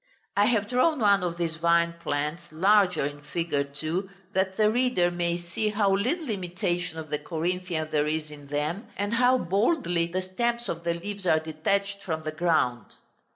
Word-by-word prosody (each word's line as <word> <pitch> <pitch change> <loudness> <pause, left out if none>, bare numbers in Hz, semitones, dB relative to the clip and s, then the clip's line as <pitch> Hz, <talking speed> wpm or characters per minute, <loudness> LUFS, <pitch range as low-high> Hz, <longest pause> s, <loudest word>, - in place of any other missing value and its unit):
I 205 - +4
have 215 -3 +2
drawn 255 +6 +2
one 200 -3 +4
of 175 -1 -2
these 165 -1 -2
vine 170 0 +3
plants 150 +3 -2
larger 185 -1 +3
in 145 0 -5
fig. 165 +3 -4 0.2
2, 170 +6 -2 0.2
that 190 0 0
the 215 -1 +4
reader 240 -8 +2
may 175 0 0
see 175 +5 -2
how 205 -2 +2
little 260 - -1
imitation 180 -3 -2
of 155 -2 -7
the 150 - 0
Corinthian 170 -1 -2
there 150 0 +2
is 155 0 -2
in 145 -1 -11
them, 150 - -2
and 205 +2 -1
how 250 +2 +4
boldly 195 - +1
the 185 +2 -2
stems 235 +5 -1
of 170 0 -4
the 170 0 +1
leaves 200 +2 -5
are 160 - +5
detached 195 +6 -1
from 160 -4 -3
the 155 - -3
ground. 140 - 0
175 Hz, 180 wpm, -27 LUFS, 160-205 Hz, 0.2 s, are